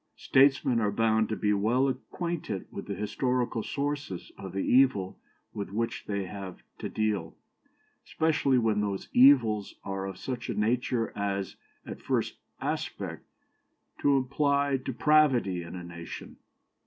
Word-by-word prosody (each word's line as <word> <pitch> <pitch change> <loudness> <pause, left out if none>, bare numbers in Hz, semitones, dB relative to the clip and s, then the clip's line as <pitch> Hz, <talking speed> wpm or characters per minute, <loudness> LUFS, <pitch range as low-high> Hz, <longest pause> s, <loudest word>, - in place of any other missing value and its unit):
Statesmen 135 -2 +4
are 105 -2 +1
bound 110 0 +2
to 110 - -1
be 105 -1 +1
well 115 +7 +2
acquainted 135 - -4
with 100 - -7
the 100 - -3
historical 125 +2 -1
sources 140 -8 -4
of 95 -2 -8
the 95 +1 -2
evil 125 -8 +3 0.3
with 100 - -4
which 115 +3 -3
they 100 -2 -2
have 95 -1 -8 0.2
to - - -4
deal, 110 -2 -1 0.7
especially 155 -5 +1
when 110 -3 +2
those 100 -2 -3
evils 120 -6 +5
are 95 0 -3
of 95 -2 -7
such 125 -2 -5
a - - -2
nature 115 +1 0
as, 100 -1 -2 0.3
at - - -8
first - - -1 0.2
aspect, - - -4 0.7
to 140 -1 +4
imply 140 +1 +1
depravity 130 -7 +2
in 85 +1 -8
a 90 - -6
nation. 85 -1 -9
115 Hz, 140 wpm, -29 LUFS, 100-135 Hz, 0.7 s, evils